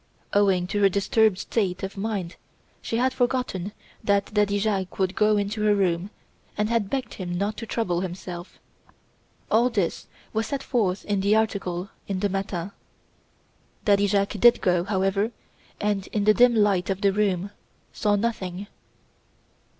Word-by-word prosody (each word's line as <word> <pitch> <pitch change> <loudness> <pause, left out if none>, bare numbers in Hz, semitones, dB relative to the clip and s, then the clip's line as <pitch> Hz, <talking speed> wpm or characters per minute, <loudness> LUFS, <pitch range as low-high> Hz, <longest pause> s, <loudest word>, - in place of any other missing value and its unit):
Owing 195 -3 +3
to 205 +3 -2
her 200 - +6
disturbed 200 +1 +2
state 195 -3 -1
of 195 - -4
mind 195 -4 -3 0.5
she 230 - -2
had 255 +2 +2
forgotten 245 -7 -1 0.3
that 200 0 +1
Daddy 205 -1 +2
Jacques 200 -3 -1
would 190 -1 +1
go 210 0 +3
into 205 +2 -2
her 210 -1 +4
room 185 -1 0 0.5
and 210 0 0
had 230 -4 0
begged 265 -2 -3
him 175 -2 -4
not 205 +3 -1
to 230 - -6
trouble 180 -8 -1
himself. 180 -1 -7 0.9
All 235 +3 +4
this 200 -8 -2 0.3
was 220 0 0
set 275 -1 -3
forth 200 -7 0
in 205 -2 0
the 200 +2 +3
article 200 -4 -1 0.2
in 195 -2 -2
the 205 - +1
'Matin.' 195 -1 -3 1.1
Daddy 205 -1 +4
Jacques 200 +1 0
did 240 +2 +6
go, 180 -2 +2
however, 195 +1 +1 0.5
and, 205 -2 -1
in 210 - -1
the 215 +1 +5
dim 245 +1 +5
light 200 -4 +2
of 195 0 -1
the 200 -2 +3
room, 200 -2 0 0.4
saw 205 -1 +1
nothing. 200 -3 -2
200 Hz, 160 wpm, -25 LUFS, 190-215 Hz, 1.1 s, her